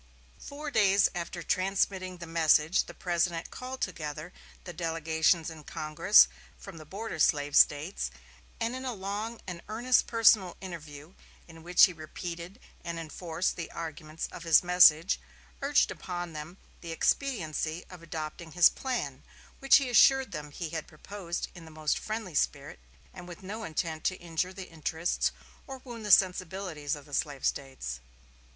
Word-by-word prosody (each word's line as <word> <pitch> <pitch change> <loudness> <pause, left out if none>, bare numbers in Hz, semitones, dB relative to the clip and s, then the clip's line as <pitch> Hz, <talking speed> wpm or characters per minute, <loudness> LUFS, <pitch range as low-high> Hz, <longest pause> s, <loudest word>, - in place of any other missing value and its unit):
Four 290 +1 -7
days 200 -4 +4
after 175 0 -5
transmitting 185 0 0
the 170 - -8
message 160 0 +3
the - - -10
President 170 -1 -1
called 255 +1 -7
together 155 -1 -4 0.3
the 175 - -8
delegations 165 0 +1
in 155 -2 -11
Congress 155 - +5 0.3
from - - -11
the 155 - -12
border 200 -1 -6
slave 145 -1 +2
States, 150 +7 +3 0.5
and 230 +2 -1
in 260 - -6
a 255 -3 -3
long 205 +4 -4
and 175 -2 -6
earnest 240 +4 +2
personal 220 -5 +4
interview, 155 -3 -9 0.3
in 165 -1 -13
which 175 +2 +6
he 185 - -4
repeated 170 +4 -7 0.2
and 170 0 -4
enforced 165 +2 -3
the 170 - -5
arguments 160 -1 -6
of - - -9
his 165 -1 +5
message, 180 -1 +6 0.4
urged 280 +1 +3
upon 175 -2 -5
them 155 +4 -8 0.2
the 170 - -7
expediency 165 - -1
of 180 -2 -11
adopting 160 0 -6
his 175 -1 +7
plan, 150 - -4 0.4
which 275 - +7
he 275 - -1
assured 265 +2 +5
them 150 -2 -6
he 155 +2 -6
had 160 -2 -4
proposed 175 +2 -6
in 175 - -11
the - - -12
most 155 -1 -1
friendly 215 -5 -5
spirit, 140 - -1 0.3
and 180 -1 -10
with 175 +1 -10
no 215 +4 -6
intent 160 -2 -3
to 185 - +1
injure 175 +1 -2
the 190 -1 -9
interests 160 +1 -1 0.4
or 270 - -7
wound 235 -3 -8
the 210 - -4
sensibilities 180 -5 +2
of 145 -2 -12
the 145 - -16
slave 140 -1 -2
States. 130 - -3
170 Hz, 160 wpm, -29 LUFS, 155-195 Hz, 0.5 s, his